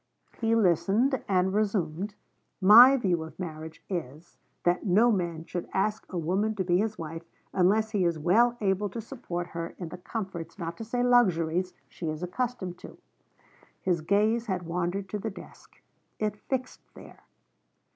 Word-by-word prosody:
He 225 0 +2
listened, 220 - +2
and 190 -1 +2
resumed: 200 -2 -1 0.4
'My 235 +8 +9
view 180 -8 0
of 160 -1 -9
marriage 160 -2 -7
is, 165 -3 -6 0.3
that 175 +1 +2
no 215 +5 +4
man 170 -5 -2
should 175 0 -5
ask 210 +2 -1
a 185 - -3
woman 190 +7 0
to 195 - -1
be 175 0 +2
his 215 +1 -1
wife 165 0 -6 0.3
unless 210 +4 +3
he 205 -4 +1
is 170 -2 +1
well 230 +10 +3
able 200 0 +1
to 230 - -6
support 180 -8 -5
her 170 0 -6
in 175 -3 -6
the 175 - -9
comforts, 190 -4 -6
not 170 -2 -5
to - - -6
say 245 +2 -1
luxuries, 185 -7 +2
she 165 - -5
is 155 +2 -5
accustomed 185 -2 -3
to.' - - -11 0.8
His 175 -3 0
gaze 215 +7 +1
had 185 -3 -2
wandered 180 +3 -2
to 210 - -3
the 220 - -3
desk; 200 - -14 0.4
it 210 -1 -1
fixed 255 +4 -4
there. - - -14
190 Hz, 165 wpm, -28 LUFS, 170-220 Hz, 0.8 s, My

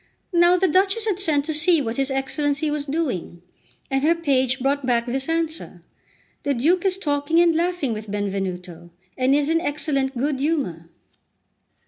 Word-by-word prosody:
Now 345 +1 +5
the 380 +1 +2
Duchess 390 +6 +2
had 405 -4 -1
sent 300 -7 +1
to 315 - -2
see 315 +2 +3
what 235 -3 -3
his 270 0 0
Excellency 285 +3 -1
was 295 -1 -3
doing, 260 - -3 0.5
and 270 0 +1
her 320 +4 +3
page 270 -5 +1
brought 275 +2 0
back 240 -2 +1
this 265 +4 -3
answer: 325 -1 -3 0.6
"The 285 -1 -1
Duke 335 +10 +2
is 380 -1 +1
talking 290 -1 0
and 340 -1 +5
laughing 340 -6 0
with 215 -1 -7
Benvenuto, 185 -4 -4 0.3
and 260 +2 +2
is 290 0 +1
in 330 +1 +1
excellent 280 -4 -1
good 275 +2 -1
humour." 265 - -2
285 Hz, 165 wpm, -22 LUFS, 255-330 Hz, 0.6 s, Now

